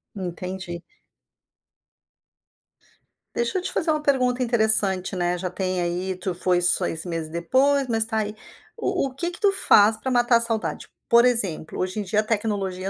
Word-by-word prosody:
Entendi. 180 Hz, -1 st, -6 dB, 2.5 s
Deixa 235 Hz, +10 st, -1 dB
eu -, -, -1 dB
te -, -, -4 dB
fazer 325 Hz, -2 st, 0 dB
uma 305 Hz, -1 st, -1 dB
pergunta 255 Hz, -3 st, +1 dB
interessante, 220 Hz, -6 st, +2 dB
né, 175 Hz, -1 st, -1 dB
já 180 Hz, 0 st, -4 dB
tem 185 Hz, -1 st, -2 dB
aí, 180 Hz, +2 st, -2 dB
tu 185 Hz, 0 st, -4 dB
foi 180 Hz, 0 st, 0 dB
6 170 Hz, -2 st, 0 dB
meses 165 Hz, -2 st, -4 dB
depois, 265 Hz, -, +1 dB
mas 225 Hz, -1 st, +1 dB
tá 220 Hz, -1 st, -2 dB
aí, 210 Hz, 0 st, -3 dB, 0.4 s
o 275 Hz, -, -1 dB
o -, -, -16 dB
que 340 Hz, +6 st, -3 dB
que 355 Hz, -, -11 dB
tu 405 Hz, -1 st, +4 dB
faz 215 Hz, -, +4 dB
pra 260 Hz, -, -4 dB
matar 240 Hz, -1 st, +3 dB
a -, -, 0 dB
saudade? 230 Hz, -1 st, -3 dB, 0.2 s
Por 235 Hz, +1 st, +6 dB
exemplo, 200 Hz, -11 st, +2 dB
hoje 185 Hz, +3 st, -2 dB
em -, -, -2 dB
dia 210 Hz, +2 st, +1 dB
a -, -, -7 dB
tecnologia 200 Hz, -4 st, -2 dB
210 Hz, 170 wpm, -23 LUFS, 180-240 Hz, 2.5 s, Por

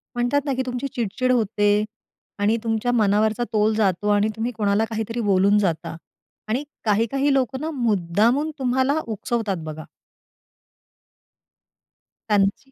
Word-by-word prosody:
म्हणतात 245 Hz, +4 st, +1 dB
ना, 280 Hz, -, 0 dB
की 260 Hz, -, -1 dB
तुमची 250 Hz, +2 st, -3 dB
चिड-चिड 245 Hz, +2 st, -1 dB
होते 210 Hz, -3 st, +2 dB, 0.6 s
आणि 210 Hz, +3 st, +2 dB
तुमच्या 225 Hz, +1 st, 0 dB
मनावरचा 215 Hz, 0 st, +2 dB
तोल 215 Hz, 0 st, +3 dB
जातो 205 Hz, -1 st, +1 dB
आणि 205 Hz, 0 st, +3 dB
तुम्ही 225 Hz, +2 st, -2 dB
कोणाला 215 Hz, -1 st, +1 dB
काहीतरी 225 Hz, +1 st, -4 dB
बोलून 200 Hz, +1 st, +4 dB
जाता 170 Hz, -4 st, -1 dB, 0.5 s
आणि 240 Hz, +6 st, -1 dB, 0.2 s
काही-काही 230 Hz, +7 st, +2 dB
लोकं 265 Hz, 0 st, 0 dB
ना 315 Hz, -, -2 dB
मुद्दामून 230 Hz, -, +1 dB
तुम्हाला 260 Hz, +3 st, +1 dB
उकसवतात 220 Hz, -2 st, -2 dB
बघा. 155 Hz, 0 st, -6 dB, 2.5 s
त्यांची 205 Hz, +6 st, +1 dB
220 Hz, 125 wpm, -23 LUFS, 205-250 Hz, 2.5 s, बोलून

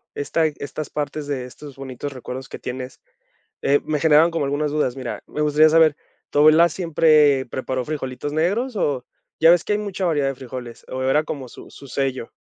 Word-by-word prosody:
esta 160 Hz, +3 st, 0 dB
estas 150 Hz, 0 st, -6 dB
partes 150 Hz, 0 st, -4 dB
de 135 Hz, -3 st, -3 dB
estos 140 Hz, +2 st, -11 dB
bonitos 135 Hz, +1 st, -6 dB
recuerdos 130 Hz, +1 st, -7 dB
que -, -, -8 dB
tienes, 125 Hz, +1 st, -6 dB, 0.6 s
eh, 140 Hz, +1 st, +3 dB
me 150 Hz, -1 st, -1 dB
generaron 160 Hz, +2 st, +5 dB
como 165 Hz, -3 st, -1 dB
algunas 145 Hz, +2 st, -1 dB
dudas. 150 Hz, -5 st, 0 dB
Mira, 130 Hz, -2 st, -5 dB
me -, -, -5 dB
gustaría 150 Hz, +1 st, +5 dB
saber, 160 Hz, -2 st, +5 dB, 0.3 s
¿tu 145 Hz, -, +2 dB
abuela 155 Hz, +3 st, +7 dB
siempre 155 Hz, -5 st, +3 dB
preparó 130 Hz, 0 st, -3 dB
frijolitos 145 Hz, -1 st, -4 dB
negros 205 Hz, -, 0 dB
o 135 Hz, -9 st, -1 dB, 0.3 s
ya 165 Hz, +1 st, +7 dB
ves 175 Hz, -1 st, +2 dB
que -, -, -1 dB
hay -, -, 0 dB
mucha 200 Hz, -2 st, -4 dB
variedad 150 Hz, -5 st, +1 dB
de 135 Hz, -, -2 dB
frijoles, 125 Hz, -2 st, -9 dB
o 130 Hz, 0 st, -4 dB
era 135 Hz, +4 st, +3 dB
como 135 Hz, -5 st, -6 dB
su -, -, -13 dB
su 140 Hz, -, -13 dB
sello? 130 Hz, -3 st, -3 dB
145 Hz, 195 wpm, -22 LUFS, 130-155 Hz, 0.6 s, abuela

